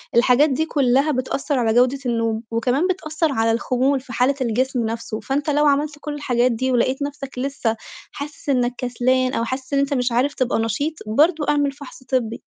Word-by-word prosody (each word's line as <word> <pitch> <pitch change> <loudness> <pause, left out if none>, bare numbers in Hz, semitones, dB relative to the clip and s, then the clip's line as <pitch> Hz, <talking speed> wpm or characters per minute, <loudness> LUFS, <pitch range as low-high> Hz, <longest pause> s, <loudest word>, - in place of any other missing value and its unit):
الحاجات 250 +5 +5
دي 295 +4 0
كُلّها 275 -1 +2
بتأثّر 270 +1 -1
على 225 -2 +2
جودة 250 +3 +3
النوم، 230 -2 -1
وكمان 250 +9 +1
بتأثّر 320 -4 -1
على 225 -2 +1
الخمول 255 +4 +1
في 255 -1 -11
حالة 255 +4 +2
الجسم 250 0 0
نفسه، 225 -1 -4
فأنت 285 +3 -2
لو 295 +1 +3
عملت 295 +1 +2
كل 300 -1 -4
الحاجات 250 -4 +1
دي، 260 +3 -1
ولقيت 255 +3 +1
نفسك 280 -2 -5
لسّه 255 -4 -1 0.4
حاسِس 290 0 -8
إنّك 250 -2 +2
كسلان، 255 +1 0
أو 230 - 0
حاسِس 260 +3 -5
إن 275 - +3
أنت 280 +1 0
مش 250 -2 0
عارف 255 +5 +1
تبقى 250 -3 0
نشيط 225 +8 -1
برضه 300 +7 +3
اعمل 290 -1 +2
فَحص 275 -2 -12
طِبّي. 240 -3 -1
260 Hz, 190 wpm, -21 LUFS, 240-285 Hz, 0.4 s, الحاجات